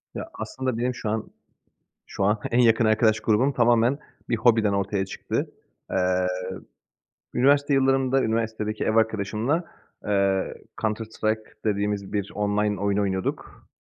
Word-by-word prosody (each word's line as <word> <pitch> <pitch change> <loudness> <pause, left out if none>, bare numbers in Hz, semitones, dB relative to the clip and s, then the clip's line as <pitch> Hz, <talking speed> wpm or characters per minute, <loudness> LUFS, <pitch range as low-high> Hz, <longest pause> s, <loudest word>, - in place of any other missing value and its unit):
Ya, - - -4
aslında 130 -3 -3
benim 125 +1 -1
şu 105 - -4
an 110 0 -3 0.8
şu 95 - -3
an 105 +2 +2
en 120 - +2
yakın 115 -1 +5
arkadaş 110 0 +3
grubum 115 +6 +2
tamamen 120 +2 +3 0.3
bir 115 - +1
hobiden 115 -3 +3
ortaya 100 0 0
çıktı. - - -3 0.4
Eee, 90 0 +1 1.1
üniversite 140 +3 +3
yıllarımda 135 0 +3
üniversitedeki 110 -1 -1
ev 110 - 0
arkadaşımla, 110 - +1 0.4
eee, 100 -2 +1 0.3
Counter 110 0 -1
Strike 110 0 -2 0.2
dediğimiz 100 -1 -1
bir 100 -1 -2
online 105 -1 0
oyun 100 0 +1
oynuyorduk. 95 -2 -3
110 Hz, 130 wpm, -25 LUFS, 100-120 Hz, 1.1 s, yakın